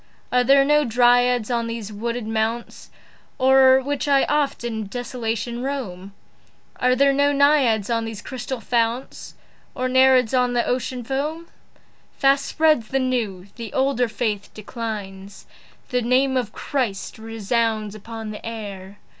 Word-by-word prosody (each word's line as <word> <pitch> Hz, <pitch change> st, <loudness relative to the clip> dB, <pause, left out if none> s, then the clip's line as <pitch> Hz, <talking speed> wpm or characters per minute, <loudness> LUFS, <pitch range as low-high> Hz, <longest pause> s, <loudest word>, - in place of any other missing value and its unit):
Are 250 Hz, 0 st, +3 dB
there 275 Hz, +2 st, +5 dB
no 295 Hz, +1 st, +4 dB
Dryads 245 Hz, -1 st, +3 dB
on 235 Hz, -1 st, 0 dB
these 230 Hz, -2 st, -6 dB
wooded 235 Hz, +2 st, -3 dB
mounts 225 Hz, +2 st, -3 dB, 0.5 s
O'er 265 Hz, 0 st, +6 dB
which 285 Hz, 0 st, -2 dB
I 275 Hz, -1 st, +4 dB
oft 295 Hz, -4 st, 0 dB
in 220 Hz, -3 st, -4 dB
desolation 235 Hz, 0 st, -4 dB
roam? 200 Hz, -9 st, -5 dB, 0.6 s
Are 250 Hz, 0 st, +2 dB
there 275 Hz, +1 st, +4 dB
no 285 Hz, +1 st, +3 dB
Naiads 280 Hz, -7 st, +3 dB
in 230 Hz, -1 st, -1 dB
these 220 Hz, -2 st, -7 dB
crystal 255 Hz, 0 st, -5 dB
founts? 235 Hz, +2 st, -2 dB, 0.4 s
Nor 255 Hz, 0 st, -1 dB
Nereids 260 Hz, -2 st, +4 dB
upon 250 Hz, -1 st, +2 dB
the 240 Hz, -1 st, +1 dB
Ocean 250 Hz, 0 st, -2 dB
foam? 300 Hz, +7 st, -3 dB, 0.7 s
Fast 275 Hz, 0 st, +3 dB
spreads 310 Hz, -8 st, +2 dB
the 270 Hz, -, -1 dB
new; 235 Hz, -8 st, -1 dB
the 230 Hz, -3 st, -7 dB
older 265 Hz, -2 st, +1 dB
faith 215 Hz, -2 st, -3 dB
declines. 205 Hz, -3 st, -7 dB, 0.4 s
The 250 Hz, -1 st, 0 dB
name 260 Hz, +3 st, +2 dB
of 245 Hz, -5 st, -1 dB
Christ 230 Hz, -8 st, -3 dB
resounds 225 Hz, -1 st, -1 dB
upon 220 Hz, +1 st, -7 dB
the 210 Hz, -, -9 dB
air. 205 Hz, -4 st, -7 dB
240 Hz, 140 wpm, -22 LUFS, 220-265 Hz, 0.7 s, O'er